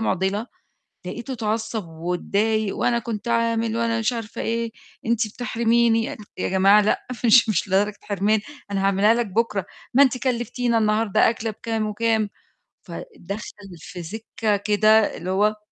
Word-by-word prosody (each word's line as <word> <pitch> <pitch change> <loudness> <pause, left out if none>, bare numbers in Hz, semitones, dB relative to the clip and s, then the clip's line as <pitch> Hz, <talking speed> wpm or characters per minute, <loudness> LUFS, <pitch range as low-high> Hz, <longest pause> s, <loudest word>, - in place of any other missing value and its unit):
مُعضلة، 200 +1 0 0.6
لقيته 240 +7 -5
اتعصّب 220 -4 -2
واتضايق 200 +6 -1
وأنا 235 -1 +1
كنت 225 -1 -5
عامل 230 -1 +1
وأنا 230 -1 0
مش 225 +2 +1
عارفة 225 -2 -6
إيه، 230 0 -2 0.3
أنتِ 230 -1 +2
بتحرميني، 230 0 +1 0.3
يا - - -1
جماعة 195 +2 +5
لأ، 210 - 0 0.2
مش 230 0 +6
مش 205 -1 0
لدرجة 200 +2 +1
حرمان، 205 +1 +1 0.3
أنا 195 -1 -1
هاعملها 200 +3 +4
لك 235 -1 0
بُكرة، 205 -2 -1 0.3
ما 275 - +7
أنتِ 260 -2 +3
كلّفتينا 245 -1 0
النهارده 215 -1 +3
أكلة 225 0 -3
بكام 220 0 -3
وكام، 215 0 0 0.5
فدَخَل 205 - -8
في 175 +2 -9
سكّة 215 +3 -2
كده 215 +1 +3
اللي 185 - -5
هو 210 +3 +2
220 Hz, 140 wpm, -23 LUFS, 205-230 Hz, 0.6 s, ما